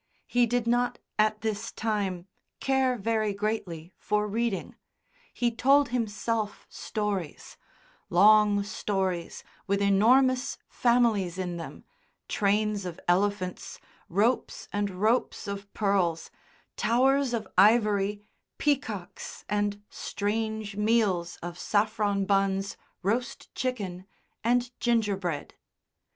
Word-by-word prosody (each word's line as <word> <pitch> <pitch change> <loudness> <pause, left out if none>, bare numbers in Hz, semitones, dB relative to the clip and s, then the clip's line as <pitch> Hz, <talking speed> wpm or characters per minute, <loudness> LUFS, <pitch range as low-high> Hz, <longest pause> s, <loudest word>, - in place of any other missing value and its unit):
He 245 -1 +2
did 245 0 0
not, 245 +1 +1 0.2
at 215 0 +2
this 220 0 -3
time, 200 -5 -2 0.3
care 265 -2 +1
very 215 -1 0
greatly 195 -5 -3
for 210 +1 0
reading; 220 -1 -2 0.6
he 240 -1 0
told 275 +4 +4
himself 225 -2 -2
stories 205 -7 -4 0.5
long 210 -1 +5
stories 190 -4 -2 0.2
with 200 0 +1
enormous 250 +7 +3
families 230 -7 +2
in 180 -2 -3
them, 165 - -8 0.4
trains 210 0 +1
of 180 -3 -6
elephants, 185 0 0 0.3
ropes 215 +8 0
and 205 0 0
ropes 215 +7 0
of 200 0 -6
pearls, 190 -6 0 0.4
towers 265 +2 +2
of 230 -2 -2
ivory, 210 -2 +4 0.3
peacocks, 225 -11 -2
and 205 0 -1
strange 215 0 -3
meals 205 -6 +1
of 175 0 -6
saffron 205 -1 +1
buns, 195 0 +1 0.3
roast 230 +6 -2
chicken, 195 -8 -3 0.4
and 245 +1 +2
gingerbread. 200 -10 0
210 Hz, 100 wpm, -28 LUFS, 195-230 Hz, 0.6 s, long